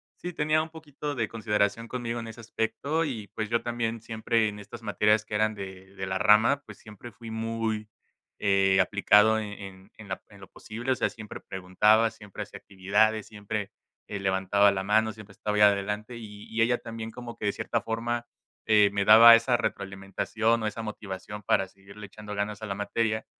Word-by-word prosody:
sí 180 - -6
tenía 155 -1 +1
un 160 - -8
poquito 150 -2 -6
de 115 -3 -1
consideración 105 +1 -1
conmigo 120 -1 -3
en 115 - -7
ese 115 +1 -11
aspecto 120 +8 -2
y, 115 -9 -4
pues, 110 -1 -3
yo 115 +1 +1
también 115 -1 -2
siempre 115 0 0
en 105 -1 -5
estas 105 - -10
materias 105 +1 +2
que 105 - -5
eran 110 +1 +2
de 95 -1 -9
de 95 0 -4
la 95 0 -1
rama, 110 +7 +5
pues, - - -12
siempre 110 +2 -12
fui 115 +2 -11
muy, 110 -1 -3 0.5
eh, 95 -1 +3
aplicado 105 +2 +4
en 105 -1 -5
en 95 0 -11
en 110 -2 -12
la 95 - -4
en 100 -2 -16
lo 95 - -11
posible, 120 +4 -5
o - - +3
sea, - - 0
siempre 110 -2 -9
preguntaba, 105 +4 +2
siempre 105 -3 -8
hacía - - -11
actividades, 100 +3 +1
siempre, 105 -1 -5 0.4
eh, 100 - -5
levantaba 95 +1 +3
la 95 -1 -2
mano, 110 +2 +2
siempre 105 -1 -13
estaba 105 +1 -3
ahí - - +3
adelante 105 +3 +1
y 105 -2 -10
y 110 0 -1
ella 120 +2 +3
también 115 -1 -7
como 120 0 -8
que - - -5
de - - +3
cierta 115 - -2
forma, 115 +2 -2 0.4
eh, 105 -2 +5
me 100 -1 +1
daba 115 +2 +10
esa 120 +1 +2
retroalimentación 110 +2 -1
o - - 0
esa 110 +1 -4
motivación 105 -1 -7
para 95 0 +2
seguirle 100 +2 -13
echando 105 0 -9
ganas 105 0 -3
a - - -4
la 100 - -3
materia, 110 +2 -1
110 Hz, 195 wpm, -27 LUFS, 100-115 Hz, 0.5 s, daba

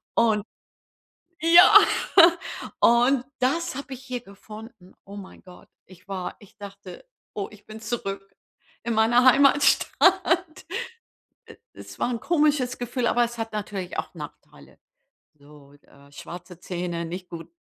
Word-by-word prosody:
Und 220 -3 +2 1.0
ja, 340 +3 +8 1.0
und 245 +2 +3
das 270 +5 -1
habe 275 0 -7
ich 260 - -10
hier 250 -2 -5
gefunden, 210 -1 -14
oh 200 +1 -11
mein 195 -2 -12
Gott. 180 -1 -16 0.2
Ich 185 +1 -19
war 190 -2 -5
ich 205 - -19
dachte: 200 - -11 0.3
„Oh, 200 -2 -4
ich 210 -1 -17
bin 220 0 -11
zurück 195 -3 -6 0.5
in 235 - -2
meiner 235 +3 +3
Heimatstadt.“ 310 +6 +3 1.1
E - - -15
es - - -12
war - - 0
'n 235 - -3
komisches 295 -6 +1
Gefühl, 245 0 -2
aber 240 +1 +2
es 235 0 -8
hat 225 -1 -5
natürlich 200 -3 -5
auch - - -7
Nachteile. - - -13 0.6
So, 145 -1 -19
äh, 140 0 -21
schwarze 175 +3 -11
Zähne, 175 -2 -4
nicht 180 +2 -8
gut, 165 -1 -9
220 Hz, 135 wpm, -24 LUFS, 185-255 Hz, 1.1 s, ja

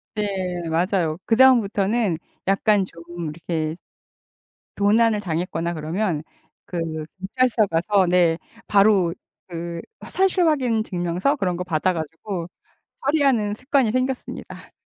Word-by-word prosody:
네. 210 - 0 0.4
맞아요. 170 -1 +1
그다음부터는 225 -6 +3 0.3
약간 195 0 +3
좀 170 -2 -13 0.3
이렇게 160 0 -3 1.0
도난을 215 +2 +3
당했거나 170 -2 -2
그러면 160 +1 -2 0.4
그 175 - -4 0.4
경찰서 225 +2 +1
가서 180 +3 +2
네 175 -2 +3 0.3
바로 200 -4 +4 0.3
그 170 -1 -5 0.3
사실확인 310 - +2
증명서 180 - 0
그런 180 -9 -1
거 180 - -2
받아 180 +1 0
가지고 165 +3 -5 0.6
처리하는 270 -8 +2
습관이 260 -2 +1
생겼습니다. 255 +1 -4
195 Hz, 255 characters per minute, -23 LUFS, 170-225 Hz, 1.0 s, 바로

